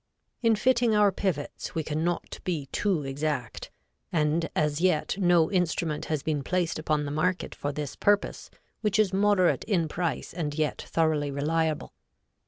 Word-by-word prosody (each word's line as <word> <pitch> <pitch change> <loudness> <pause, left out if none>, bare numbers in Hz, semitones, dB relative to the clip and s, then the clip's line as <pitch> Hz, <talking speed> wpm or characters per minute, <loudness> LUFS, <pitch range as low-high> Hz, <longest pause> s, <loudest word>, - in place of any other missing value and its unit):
In 230 -2 +4
fitting 235 0 +3
our 205 -1 +5
pivots, 180 -6 -3
we 160 - 0
can 155 +1 -2
not 175 0 -2
be 165 -6 -2
too 190 -7 0
exact; 135 -3 -3 0.4
and 160 +1 +1
as 150 0 +1
yet 180 -3 +2
no 175 -4 +4
instrument 170 -4 0
has 155 -3 -2
been 150 -3 -1
placed 180 -1 -1
upon 155 -1 0
the 145 - -4
market 180 +5 -1
for 145 - -3
this 145 -2 -5
purpose 205 0 +1 0.3
which 210 -2 +1
is 210 -3 +3
moderate 195 -2 +3
in 180 -7 +1
price 170 +2 -3
and 155 -4 -3
yet 155 -1 0
thoroughly 155 -3 0
reliable. 155 +2 -1
165 Hz, 160 wpm, -27 LUFS, 150-185 Hz, 0.4 s, our